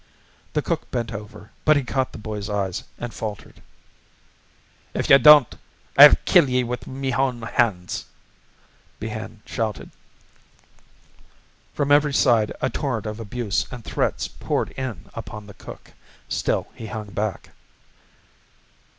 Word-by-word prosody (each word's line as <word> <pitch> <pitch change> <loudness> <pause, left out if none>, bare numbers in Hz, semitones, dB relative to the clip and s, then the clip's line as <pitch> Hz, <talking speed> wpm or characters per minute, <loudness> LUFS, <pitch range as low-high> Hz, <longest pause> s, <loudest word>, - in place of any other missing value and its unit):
The - - 0
cook - - -3
bent 115 -2 -3
over, 105 0 -9
but 155 -1 +5
he 140 - 0
caught 130 +1 -1
the - - -9
boy's 105 -1 -6
eyes 100 -3 -2
and 120 -1 -6
faltered. 105 -3 -7 1.3
"If - - 0
ye 135 - +11
don't, 150 -5 +8 0.4
I'll - - +10
kill 165 -7 +5
ye 125 0 +2
with 125 0 -5
me 135 0 -3
own 130 -1 0
hands," 105 -7 -1 0.9
Behane 110 0 -6
shouted. 110 -4 -4 1.8
From 145 -1 0
every 145 -1 +4
side 115 -7 +3
a - - +1
torrent 125 -7 -2
of 110 +1 -5
abuse 115 -1 -2
and 125 -3 -9
threats - - -1
poured - - -3
in 115 -8 -6
upon 105 -2 -8
the 100 - -12
cook. - - -12 0.3
Still - - -1
he 110 - -8
hung 105 -2 -6
back. 105 0 -3
115 Hz, 135 wpm, -23 LUFS, 105-130 Hz, 1.8 s, ye